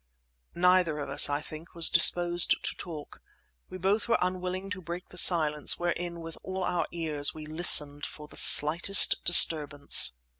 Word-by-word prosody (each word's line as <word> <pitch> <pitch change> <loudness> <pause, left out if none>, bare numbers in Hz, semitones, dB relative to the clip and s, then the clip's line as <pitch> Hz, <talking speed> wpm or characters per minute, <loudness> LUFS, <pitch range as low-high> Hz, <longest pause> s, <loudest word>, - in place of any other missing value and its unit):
Neither 180 -3 -1
of 145 -2 -9
us, 145 - +3
I 145 +1 -5
think, 155 +2 -14
was 170 -1 0
disposed 175 0 +1
to - - -6
talk. 155 -4 -13 0.5
We - - -11
both 195 +5 -4
were 235 - -1
unwilling 185 +1 -7
to 185 -2 -9
break 175 +1 -11
the 180 - -16
silence, 150 -4 +2
wherein, 175 0 -7
with 165 0 -13
all 190 0 -8
our 175 -1 -5
ears, 155 -4 -1
we 155 -1 -12
listened 150 -2 +2
for 150 -1 -14
the - - -19
slightest 170 +6 +4
disturbance. 150 - +3
170 Hz, 160 wpm, -24 LUFS, 150-180 Hz, 0.5 s, slightest